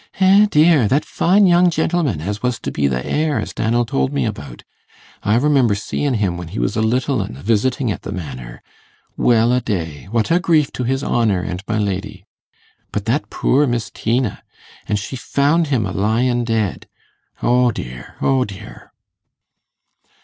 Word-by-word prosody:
'Eh, 195 +2 +6
dear! 150 - +4
that 140 +7 +1
fine 195 +4 +3
young 175 0 +5
gentlemen 160 - 0
as 105 +5 -4
was 125 -2 -1
to - - -5
be 70 -1 0
th' 65 -1 -2
heir, 155 -1 0
as - - -5
Dannel 120 +2 0
told 135 +1 -1
me 140 - 0
about. 70 - -6 0.6
I 105 - +1
remember 130 -4 +3
seein' 130 +6 -2
him 100 -5 -1
when 90 -1 -7
he - - -8
was - - -1
a - - +1
little 125 +2 +1
un, 95 -9 -6
a - - -12
visitin' 115 +3 +1
at - - -5
the - - -7
Manor. 65 -8 -7 0.5
Well 120 0 +3
a 125 - +2
day, 80 - -4
what 115 +5 0
a 170 - +4
grief 160 -6 +2
to 125 - -3
his 135 +2 -1
honour 110 -6 +1
and 90 +1 -5
my 110 - -1
lady. 100 -1 -3 0.7
But - - -3
that - - -1
poor 145 +2 +2
Miss 120 -2 -2
Tina 115 -1 -1 0.5
an' 105 - 0
she 105 +6 -4
found 145 +6 +1
him 130 -7 0
a 95 - -4
lyin' 120 +5 +1
dead? 110 -5 -2 0.6
O 125 0 +3
dear, 60 - -8
O 135 -1 +3
dear! 105 -1 -11
115 Hz, 180 wpm, -19 LUFS, 100-140 Hz, 0.7 s, Eh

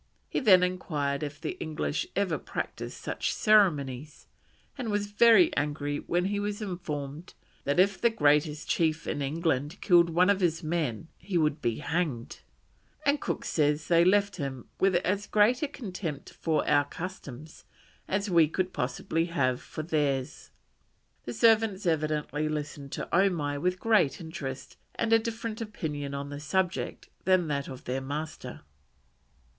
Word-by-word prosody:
He - - -1
then 190 -8 +6
enquired 150 -6 -1
if 145 -1 -5
the 155 - -3
English 155 -1 -2
ever 190 -5 0
practised - - -5
such - - -2
ceremonies, 150 - +2 0.5
and 250 -5 -4
was 205 0 -1
very 220 -3 +6
angry 145 0 -1
when 175 +1 -1
he 200 +1 -1
was 205 0 -3
informed 165 -5 -5 0.3
that 140 +5 +1
if 195 +1 +3
the 235 - +5
greatest 150 -5 +2
chief 160 -1 +1
in 145 - -2
England 150 +2 -1
killed 175 -3 +5
one 180 +4 +4
of 200 - +1
his 165 -3 0
men 155 -4 -2
he 180 0 -2
would 155 -2 +1
be 115 -1 0
hanged; 155 -8 -2 0.7
and 285 0 +2
Cook - - -3
says 150 0 +1
they 170 -1 +5
left 200 +2 +3
him 135 -5 -5
"with 190 -1 +3
as 195 +3 0
great 215 +4 +3
a 300 - +1
contempt 185 - -6
for 160 -2 -1
our 145 -1 +4
customs 155 -3 -8 0.4
as 200 +2 -1
we 170 -4 +5
could 185 +4 -2
possibly 135 +6 -1
have 135 -7 0
for 155 - -7
theirs." 145 -5 -1 0.8
The 120 - -4
servants 220 -4 +3
evidently 155 -2 0
listened 145 -2 -5
to - - -4
Omai 165 -6 +2
with 180 +1 0
great 215 -11 +3
interest 150 -6 -7 0.2
and 225 0 +1
a 225 - +7
different 230 0 -4
opinion 150 -10 -4
on 140 0 -5
the 145 0 -6
subject 185 +4 -2 0.2
than 185 -3 +3
that 140 -1 -1
of 130 -2 -9
their 130 +2 -2
master. 150 +4 -6
165 Hz, 155 wpm, -28 LUFS, 145-190 Hz, 0.8 s, a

